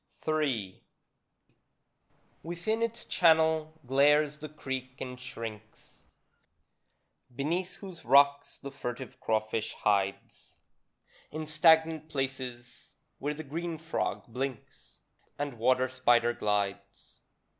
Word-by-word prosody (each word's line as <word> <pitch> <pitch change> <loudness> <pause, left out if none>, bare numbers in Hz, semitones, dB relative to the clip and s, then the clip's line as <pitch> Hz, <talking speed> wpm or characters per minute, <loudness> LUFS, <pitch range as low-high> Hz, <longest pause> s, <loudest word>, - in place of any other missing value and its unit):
III 135 -12 0 1.6
Within 175 +7 -2
its 230 +1 -2
channel 160 -2 +3
glares 145 +3 +4
the 155 0 -8
creek 130 -3 -6
and 125 -1 -6
shrinks, 110 -3 -9 1.3
Beneath 170 +7 -1
whose 185 -4 -10
rocks 140 +3 +4
the 140 - -8
furtive 130 -2 -6
crawfish 110 0 -1
hides 100 -1 -1 0.7
In 155 +1 -5
stagnant 160 0 +4
places, 130 -3 -5 0.2
where 145 +2 -2
the 155 - -6
green 165 +3 -4
frog 160 +1 -2
blinks, 125 0 -6 0.4
And 140 -5 -4
water 130 +2 +3
spider 120 -2 +3
glides. 100 -2 -3
140 Hz, 95 wpm, -30 LUFS, 120-155 Hz, 1.6 s, glares